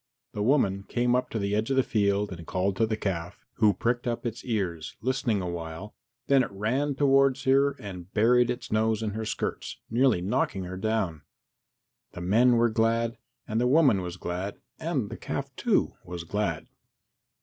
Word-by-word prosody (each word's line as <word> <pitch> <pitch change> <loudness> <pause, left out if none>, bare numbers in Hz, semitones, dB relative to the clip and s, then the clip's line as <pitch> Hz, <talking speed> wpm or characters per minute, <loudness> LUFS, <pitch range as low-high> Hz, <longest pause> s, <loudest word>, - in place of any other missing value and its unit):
The 105 - -3
woman 105 -5 +2
came 120 +4 0
up 125 0 0
to - - -3
the 100 -1 -1
edge 110 +3 0
of 135 - +1
the 130 - +5
field 100 -2 +1
and 85 -2 -8
called 95 +1 0
to 115 - +2
the 110 -1 -1
calf, 90 -4 -4
who 110 -3 +5
pricked 120 +5 -1
up 120 0 -2
its 115 +1 -4
ears, 90 -9 -3
listening 120 -4 0
awhile, 85 +2 -6 0.3
then 135 -1 +4
it 125 - -1
ran 125 +9 -1
towards 135 -1 +3
her 140 +1 +4
and 95 -2 -8
buried 120 +3 +4
its 125 0 -4
nose 110 0 +1
in 105 - -1
her 110 +2 -4
skirts, - - -3
nearly 120 -4 +3
knocking 95 +1 -1
her 90 +1 -6
down. 95 -6 -1 0.9
The 90 - -7
men 115 +8 +4
were 120 0 +4
glad, 115 +1 +1 0.3
and 110 +2 0
the 125 - +3
woman 135 -8 +4
was 90 0 -6
glad, 90 +3 -4 0.2
and 145 -10 -2
the - - -6
calf, - - -5
too, - - +1
was 85 -1 -6
glad. 85 -2 -2
110 Hz, 185 wpm, -27 LUFS, 95-125 Hz, 0.9 s, the